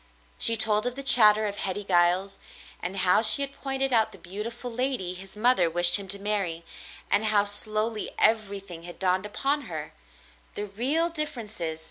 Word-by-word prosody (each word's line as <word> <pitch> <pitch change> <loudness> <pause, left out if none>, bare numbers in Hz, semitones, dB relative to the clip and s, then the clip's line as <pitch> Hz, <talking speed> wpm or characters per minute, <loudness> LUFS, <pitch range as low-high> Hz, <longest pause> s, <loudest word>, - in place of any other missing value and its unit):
She 230 0 +4
told 215 +1 +3
of 245 - -5
the 275 - -8
chatter 215 -5 +5
of 205 -1 -5
Hetty 195 +2 +1
Giles, 185 +1 +1 0.4
and 180 +3 -5
how 180 +4 +4
she 220 +5 +7
had 275 0 -6
pointed 270 -1 -3
out 225 -2 +1
the - - -13
beautiful 210 +6 -8
lady 245 -7 -3
his 190 +2 -13
mother 215 -6 +2
wished 175 +2 +5
him 200 -1 -10
to 200 +1 -3
marry 195 -5 -3 0.2
— - - -15
and 215 - +1
how 210 -2 +2
slowly 215 +2 -3
everything 200 -5 -2
had 175 +1 -11
dawned 185 +1 -2
upon 280 +7 -3
her - - -8 0.3
— - - -30
the 205 - -4
real 265 - 0
differences. 220 - -5
210 Hz, 180 wpm, -25 LUFS, 190-235 Hz, 0.4 s, she